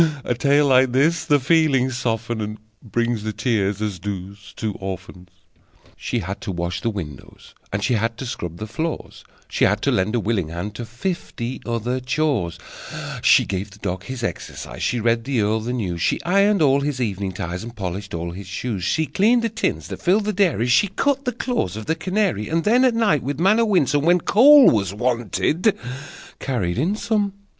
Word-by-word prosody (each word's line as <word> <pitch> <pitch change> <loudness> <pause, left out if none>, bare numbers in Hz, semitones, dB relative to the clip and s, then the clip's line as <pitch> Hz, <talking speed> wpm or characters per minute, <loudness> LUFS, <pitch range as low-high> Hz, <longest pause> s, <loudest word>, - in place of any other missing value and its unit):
A - - 0
tale 140 +4 +3
like 130 -2 +4
this 155 +5 +2
the 145 -3 +4
feelings 135 -3 +2
softens, 115 -1 -2
And 105 0 -4 0.3
brings 120 -2 0
the 110 +1 -3
tears, 105 -3 0
as 100 -4 -3
does 100 0 -7
"Two 110 -2 -3
Orphans.") 95 -1 -7 0.7
She 125 - -3
had 95 +1 -5
to - - -4
wash 85 0 -3
the 115 - 0
windows, 80 - -8 0.2
and 100 0 -2
She 110 - +1
had 115 +1 0
to 135 - -5
scrub 85 -8 -5
the 110 - -5
floors, 160 +9 -5 0.2
She - - -1
had - - +1
to - - +2
lend 105 +5 +1
a - - +2
willing 105 -6 -1
hand 85 +6 -5
To 120 +2 -6
fifty 120 - -4
other 120 +2 -1
chores: 130 - -1 0.6
She - - +5
gave 95 +1 -3
the 100 - -15
dog 95 -2 -4
his 130 -2 -6
exercise, - - -5
She 125 - 0
read 115 +1 +1
the 130 -1 -1
earl 105 +2 +1
the 115 +3 -4
news, 95 -9 -3
She - - +1
ironed 200 +1 +3
all 140 -1 +4
his 140 -2 -2
evening 100 -5 -2
ties, 90 +2 -4
And 120 +1 -9
polished 100 -1 -5
all 85 +1 -4
his 95 +2 -9
shoes, 95 0 -4
She 160 - +1
cleaned 230 +8 +2
the 230 - +1
tins 225 +1 -2
that - - -7
filled 200 +4 +2
the 210 - 0
dairy, 180 - +2
She 125 +11 +4
cut 275 +8 0
the 250 - +1
claws 240 - -2
of 110 0 -6
the 160 - +1
canary, 185 - -1
And 165 +1 0
then, 240 +5 +4
at 245 -3 +3
night, 210 - +2
with 140 +2 -4
manner 210 +6 +4
winsome, 145 - +2
When 175 +1 +5
coal 275 - +7
was 100 -3 0
wanted, 120 - 0 0.6
carried 115 -8 -2
in 180 +9 +1
some! 210 -2 0
120 Hz, 200 wpm, -22 LUFS, 100-160 Hz, 0.7 s, coal